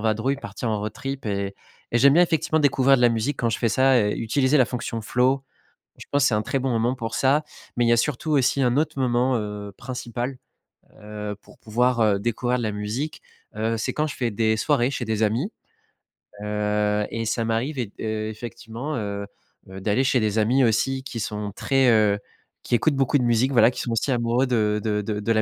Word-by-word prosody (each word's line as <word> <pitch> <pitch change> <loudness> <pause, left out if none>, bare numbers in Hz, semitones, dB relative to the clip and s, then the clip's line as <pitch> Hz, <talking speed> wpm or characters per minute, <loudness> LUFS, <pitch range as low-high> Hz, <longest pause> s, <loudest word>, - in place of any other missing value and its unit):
vadrouille, 110 +5 0
partir 120 - -4
en 105 -1 -1
road 105 +1 -4
trip 135 +3 -6
et 100 -1 -2 0.4
et 120 - +3
j'aime 140 +2 +6
bien, 175 - +6
effectivement, 160 -1 0
découvrir 135 -2 +4
de - - -1
la 120 - +7
musique 115 +5 -1
quand 120 - +1
je 110 - -1
fais 115 - +2
ça 130 +4 +4
et 105 -1 +1
utiliser 130 +5 +2
la 130 - +6
fonction 115 -2 -4
flow 130 +4 +1 0.5
et - - -23
je - - -10
pense 140 -1 +2
que - - +5
c'est - - -2
un 105 - +2
très 135 - -1
bon 130 - -1
moment 120 +1 +1
pour 115 -3 -5
ça. 140 +3 +2 0.3
Mais 120 - +2
il 115 - +3
y - - +4
a 120 - +4
surtout, 150 +4 -1
aussi, 140 -1 +2
un 125 0 +2
autre 155 -2 0
moment, 125 0 +2
heu, 105 -1 -5
principal, 125 0 -5 0.6
heu, 105 0 -6
pour - - -19
pouvoir, 120 +2 +1
heu, 105 -3 +3
découvrir 120 +3 -1
de 120 - -3
la 110 - -1
musique, 110 +9 -4 0.3
heu, 110 +1 -1
c'est 110 - -2
quand 155 +1 0
je 145 - -6
fais 120 -2 0
des 110 +1 +1
soirées 120 +3 +1
chez 125 - -3
des 110 0 0
amis, 115 - 0 0.9
heu 105 0 0
et 115 0 -3
ça 115 +1 -1
m'arrive 120 +6 -1
et 120 - -1
d - - -22
heu, 110 0 -2
effectivement, 120 +5 -6
heu 100 -3 -3 0.4
heu, 95 0 -9
d'aller 105 +6 +1
chez 130 -1 +2
des 110 -1 0
amis, 125 +5 +3
aussi, 125 +4 +1
qui 120 -3 -6
sont 105 -1 -4
très, 135 -2 +2
heu, 105 -3 +3 0.4
qui - - +1
écoutent 145 +5 +2
beaucoup 135 +1 +2
de 125 - 0
musique, 120 +3 +2
voilà, 115 -2 +5
qui - - -5
sont 120 - -3
aussi 115 +4 0
amoureux 120 +1 +1
de 105 -3 +1
de 105 -1 0
de 105 +1 -2
la 110 -1 +3
115 Hz, 225 wpm, -24 LUFS, 110-130 Hz, 0.9 s, la